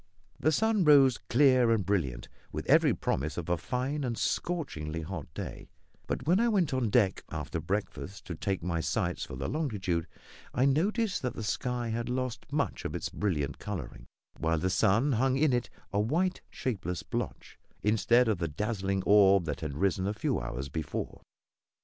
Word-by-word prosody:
The 155 Hz, -, +3 dB
sun 220 Hz, +3 st, +2 dB
rose 140 Hz, -5 st, +6 dB
clear 130 Hz, -2 st, +5 dB
and 110 Hz, -4 st, +2 dB
brilliant, 70 Hz, -12 st, -1 dB, 0.2 s
with -, -, -4 dB
every -, -, +5 dB
promise 70 Hz, +3 st, -2 dB
of 85 Hz, -1 st, -4 dB
a 85 Hz, -, +3 dB
fine 130 Hz, -, -2 dB
and 120 Hz, -3 st, -2 dB
scorchingly 80 Hz, -, -2 dB
hot 80 Hz, -5 st, -6 dB
day; -, -, -6 dB, 0.4 s
but -, -, -3 dB
when 175 Hz, +5 st, +4 dB
I 235 Hz, +1 st, +3 dB
went 185 Hz, -10 st, +2 dB
on 130 Hz, -4 st, +1 dB
deck 100 Hz, -4 st, +2 dB
after 80 Hz, +1 st, -4 dB
breakfast 100 Hz, +2 st, -4 dB
to 90 Hz, -, -5 dB
take 95 Hz, +2 st, -2 dB
my 85 Hz, -1 st, -1 dB
sights -, -, -1 dB
for -, -, -8 dB
the 65 Hz, +1 st, -3 dB
longitude, 95 Hz, -, -1 dB, 0.5 s
I 125 Hz, -, +3 dB
noticed 195 Hz, -, +1 dB
that 125 Hz, -, -2 dB
the 115 Hz, -, -5 dB
sky 120 Hz, +3 st, -2 dB
had 115 Hz, +2 st, -2 dB
lost 125 Hz, -1 st, -3 dB
much 145 Hz, 0 st, -1 dB
of -, -, -4 dB
its -, -, -3 dB
brilliant 80 Hz, -9 st, -2 dB
colouring, 60 Hz, -3 st, -6 dB, 0.3 s
while 80 Hz, +1 st, +1 dB
the 90 Hz, +4 st, 0 dB
sun 115 Hz, +11 st, +3 dB
hung 130 Hz, +2 st, +2 dB
in 150 Hz, -2 st, +3 dB
it 120 Hz, -1 st, 0 dB, 0.2 s
a 100 Hz, -, +2 dB
white, 170 Hz, -, +1 dB
shapeless 95 Hz, -8 st, -3 dB
blotch, -, -, -5 dB, 0.2 s
instead 115 Hz, +3 st, +4 dB
of 105 Hz, -5 st, +1 dB
the 85 Hz, -, 0 dB
dazzling 95 Hz, +2 st, -2 dB
orb 100 Hz, -3 st, +6 dB
that 75 Hz, +1 st, -3 dB
had 75 Hz, -3 st, -4 dB
risen 95 Hz, +1 st, +1 dB
a 105 Hz, -, -1 dB
few 110 Hz, -, 0 dB
hours -, -, -4 dB
before. 75 Hz, +2 st, -4 dB
105 Hz, 180 wpm, -30 LUFS, 85-130 Hz, 0.5 s, rose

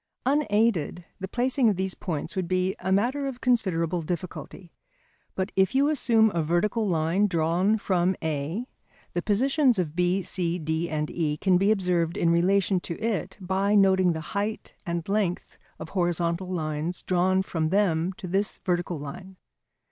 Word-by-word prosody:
Unaided, 220 Hz, -, +1 dB
the 190 Hz, -, -4 dB
placing 250 Hz, +3 st, +2 dB
of 205 Hz, -, +1 dB
these 190 Hz, 0 st, -2 dB
points 160 Hz, -1 st, -4 dB
would 185 Hz, -2 st, -1 dB
be 185 Hz, +1 st, 0 dB
a 190 Hz, +1 st, -2 dB
matter 250 Hz, +8 st, +1 dB
of 255 Hz, -2 st, -5 dB
considerable 180 Hz, -9 st, +1 dB
difficulty. 175 Hz, +1 st, -6 dB, 0.6 s
But 190 Hz, +2 st, -2 dB
if 190 Hz, +4 st, +2 dB
you 280 Hz, +2 st, +4 dB
assume 225 Hz, -7 st, +3 dB
a 170 Hz, -, +1 dB
vertical 205 Hz, +8 st, 0 dB
line 170 Hz, +4 st, +2 dB
drawn 175 Hz, +4 st, +1 dB
from 185 Hz, -2 st, +1 dB
A, 160 Hz, +8 st, -2 dB, 0.5 s
the 175 Hz, -, -1 dB
positions 255 Hz, -, +2 dB
of 165 Hz, -4 st, -2 dB
B, 180 Hz, +2 st, +1 dB
C, 175 Hz, -2 st, -2 dB
D, 160 Hz, +1 st, -2 dB
and 150 Hz, -1 st, -2 dB
E 150 Hz, -3 st, -1 dB
can 185 Hz, +1 st, +3 dB
be 195 Hz, +2 st, +3 dB
observed 180 Hz, -5 st, +1 dB
in 170 Hz, -, +2 dB
relation 185 Hz, +2 st, +2 dB
to 170 Hz, -1 st, -6 dB
it 220 Hz, -3 st, -2 dB
by 195 Hz, +2 st, 0 dB
noting 190 Hz, -3 st, +4 dB
the 160 Hz, -, -4 dB
height 205 Hz, +2 st, -3 dB
and 170 Hz, -1 st, -3 dB
length 195 Hz, -3 st, -1 dB, 0.2 s
of 160 Hz, -, -8 dB
horizontal 175 Hz, -1 st, -1 dB
lines 160 Hz, 0 st, -3 dB
drawn 185 Hz, +1 st, +2 dB
from 160 Hz, -4 st, -1 dB
them 180 Hz, -3 st, +1 dB
to 185 Hz, -, -8 dB
this 195 Hz, +3 st, -1 dB
vertical 175 Hz, -1 st, -1 dB
line. 150 Hz, +7 st, -9 dB
185 Hz, 165 wpm, -26 LUFS, 170-205 Hz, 0.6 s, you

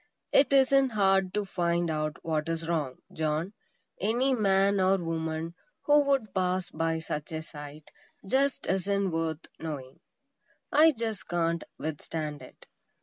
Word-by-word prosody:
It 275 Hz, -, +5 dB
isn't 275 Hz, 0 st, +5 dB
hard 195 Hz, -2 st, +3 dB
to 210 Hz, -1 st, 0 dB
find 170 Hz, -2 st, 0 dB
out 155 Hz, 0 st, -2 dB
what 155 Hz, -1 st, -1 dB
is 165 Hz, 0 st, -3 dB
wrong, 150 Hz, -6 st, -1 dB, 0.2 s
John; 155 Hz, +4 st, -1 dB, 0.5 s
any 240 Hz, +7 st, +2 dB
man 200 Hz, -3 st, +3 dB
or 190 Hz, +1 st, +4 dB
woman 165 Hz, -1 st, -3 dB, 0.3 s
who 295 Hz, 0 st, +5 dB
would 270 Hz, -8 st, +1 dB
pass 185 Hz, -1 st, 0 dB
by 165 Hz, 0 st, 0 dB
such 160 Hz, 0 st, -5 dB
a 160 Hz, 0 st, -3 dB
sight, 150 Hz, -1 st, -10 dB, 0.3 s
just 270 Hz, +7 st, +1 dB
isn't 195 Hz, 0 st, 0 dB
worth 165 Hz, -1 st, -2 dB
knowing. 140 Hz, -5 st, -6 dB, 0.7 s
I 320 Hz, +1 st, +7 dB
just 225 Hz, -5 st, -4 dB
can't 170 Hz, -1 st, 0 dB
withstand 155 Hz, -1 st, -4 dB
it! -, -, -14 dB
175 Hz, 140 wpm, -29 LUFS, 160-200 Hz, 0.7 s, I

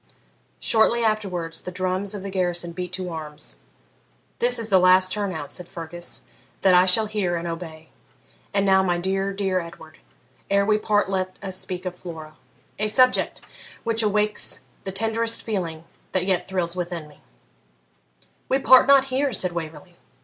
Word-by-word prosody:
Shortly 230 Hz, +1 st, +3 dB
afterwards 185 Hz, -7 st, -1 dB
the 180 Hz, -, -6 dB
drums 185 Hz, +2 st, -2 dB
of 195 Hz, -, -6 dB
the 200 Hz, -, -5 dB
garrison 175 Hz, -2 st, -1 dB
beat 180 Hz, +1 st, -5 dB
to 185 Hz, -1 st, -3 dB
arms. 155 Hz, -2 st, -7 dB, 0.8 s
'This 485 Hz, +1 st, +3 dB
is 225 Hz, -1 st, -2 dB
the 190 Hz, -2 st, +5 dB
last 185 Hz, +1 st, +5 dB
turn 205 Hz, -1 st, -1 dB
out,' 145 Hz, -4 st, -6 dB
said 180 Hz, +2 st, -7 dB
Fergus, 175 Hz, +1 st, -7 dB, 0.4 s
'that 190 Hz, -1 st, +5 dB
I 180 Hz, +1 st, +6 dB
shall 215 Hz, +4 st, +4 dB
hear 205 Hz, -5 st, -1 dB
and 170 Hz, 0 st, -3 dB
obey. 165 Hz, -2 st, -7 dB, 0.6 s
And 200 Hz, -1 st, +1 dB
now, 190 Hz, -1 st, +5 dB
my 180 Hz, -2 st, +1 dB
dear, 195 Hz, +2 st, -1 dB
dear 195 Hz, -2 st, 0 dB
Edward, 165 Hz, -2 st, -11 dB, 0.5 s
ere 200 Hz, 0 st, +3 dB
we 215 Hz, 0 st, +3 dB
part 210 Hz, -1 st, +1 dB
let 185 Hz, -1 st, -2 dB
us 190 Hz, -1 st, -4 dB
speak 185 Hz, -1 st, -5 dB
of 180 Hz, -, -3 dB
Flora 160 Hz, -3 st, -9 dB, 0.4 s
a 215 Hz, -, +1 dB
subject 255 Hz, +4 st, +3 dB, 0.4 s
which 230 Hz, 0 st, +1 dB
awakes 210 Hz, -8 st, +1 dB, 0.2 s
the 190 Hz, -, -3 dB
tenderest 225 Hz, +3 st, 0 dB
feeling 170 Hz, -7 st, -3 dB, 0.3 s
that 185 Hz, -1 st, +1 dB
yet 185 Hz, -2 st, 0 dB
thrills 180 Hz, -2 st, -2 dB
within 175 Hz, -3 st, -4 dB
me' 150 Hz, -, -19 dB, 1.3 s
'We 265 Hz, -, +3 dB
part 260 Hz, -1 st, +6 dB
not 275 Hz, -1 st, +6 dB
here!' 275 Hz, +1 st, +1 dB
said 185 Hz, -4 st, 0 dB
Waverley. 165 Hz, +1 st, -7 dB
185 Hz, 165 wpm, -24 LUFS, 175-210 Hz, 1.3 s, I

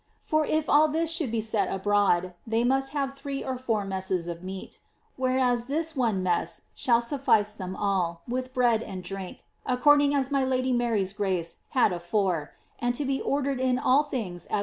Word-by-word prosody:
For 310 Hz, -1 st, 0 dB
if 310 Hz, 0 st, 0 dB
all 300 Hz, +2 st, +5 dB
this 320 Hz, +2 st, 0 dB
should 320 Hz, -7 st, 0 dB
be 230 Hz, -1 st, 0 dB
set 215 Hz, -3 st, +1 dB
abroad^ 195 Hz, -2 st, +1 dB
they 225 Hz, +1 st, +1 dB
must 270 Hz, +2 st, +1 dB
have 275 Hz, -2 st, -1 dB
three 275 Hz, 0 st, -5 dB
or 260 Hz, -, -3 dB
four 225 Hz, -5 st, -1 dB
messes 190 Hz, -2 st, -2 dB
f 170 Hz, -1 st, -4 dB
j:io 185 Hz, -, -7 dB
ac. -, -, -14 dB, 0.2 s
— -, -, -41 dB
whereas 255 Hz, -2 st, +1 dB
this 315 Hz, +4 st, -1 dB
one 225 Hz, -8 st, +1 dB
mess 175 Hz, -2 st, -1 dB
shall 235 Hz, -2 st, +2 dB
suffice 235 Hz, -5 st, +2 dB
them 185 Hz, -3 st, -6 dB
all, 180 Hz, -5 st, -1 dB
with 255 Hz, +1 st, -3 dB
bread 240 Hz, -4 st, +2 dB
and 185 Hz, -4 st, -6 dB
drink, 190 Hz, 0 st, -7 dB, 0.2 s
a 250 Hz, -, 0 dB
"^ -, -, -14 dB
nlir.;; 290 Hz, +1 st, +5 dB
as 265 Hz, +1 st, -3 dB
my 275 Hz, -1 st, +2 dB
Lady 260 Hz, 0 st, +1 dB
Mary's 225 Hz, -6 st, 0 dB
grace 185 Hz, -5 st, -2 dB, 0.2 s
had 225 Hz, -6 st, +4 dB
afore, 175 Hz, -3 st, -1 dB, 0.3 s
and 245 Hz, 0 st, 0 dB
to 290 Hz, -, -2 dB
be 270 Hz, 0 st, -1 dB
ordered 275 Hz, -1 st, -1 dB
in 255 Hz, -1 st, +2 dB
all 260 Hz, +2 st, +4 dB
things 200 Hz, -11 st, -4 dB
as -, -, 0 dB
240 Hz, 200 wpm, -27 LUFS, 195-270 Hz, 0.3 s, all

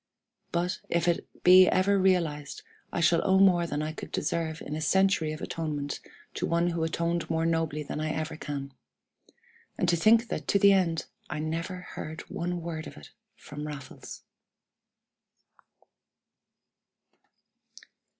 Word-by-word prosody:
But, 175 Hz, +1 st, -1 dB
if 170 Hz, 0 st, +1 dB
it 170 Hz, -, +1 dB, 0.2 s
be 185 Hz, +1 st, +8 dB
ever 195 Hz, +2 st, +3 dB
realized, 165 Hz, -6 st, 0 dB, 0.3 s
I 175 Hz, -, -1 dB
shall 170 Hz, 0 st, +4 dB
owe 190 Hz, -1 st, +3 dB
more 180 Hz, -3 st, +5 dB
than 150 Hz, -1 st, -2 dB
I 155 Hz, -, -2 dB
could 155 Hz, -, -9 dB
deserve 160 Hz, +1 st, -2 dB
in 150 Hz, -, -5 dB
a 155 Hz, -, -4 dB
century 190 Hz, -1 st, +2 dB
of 155 Hz, -, -7 dB
atonement 150 Hz, -3 st, -3 dB, 0.3 s
to -, -, -2 dB
one 170 Hz, +1 st, +2 dB
who 165 Hz, -1 st, -1 dB
atoned 170 Hz, +1 st, -1 dB
more 165 Hz, 0 st, 0 dB
nobly 160 Hz, -2 st, 0 dB
than 150 Hz, -, -5 dB
I 155 Hz, 0 st, -1 dB
ever 155 Hz, 0 st, -3 dB
can. 140 Hz, -3 st, -6 dB, 1.0 s
And 180 Hz, -, 0 dB
to 170 Hz, -, +4 dB
think 225 Hz, +7 st, +4 dB
that -, -, -4 dB
to -, -, +3 dB
the 200 Hz, 0 st, +6 dB
end 170 Hz, -4 st, +1 dB, 0.2 s
I -, -, -3 dB
never 165 Hz, +4 st, -3 dB
heard 160 Hz, -2 st, -7 dB
one 175 Hz, 0 st, -3 dB
word 160 Hz, -2 st, -5 dB
of -, -, -11 dB
it 75 Hz, -, -13 dB, 0.2 s
from 150 Hz, +1 st, -8 dB
Raffles! 140 Hz, -3 st, -9 dB
165 Hz, 150 wpm, -28 LUFS, 155-180 Hz, 1.0 s, be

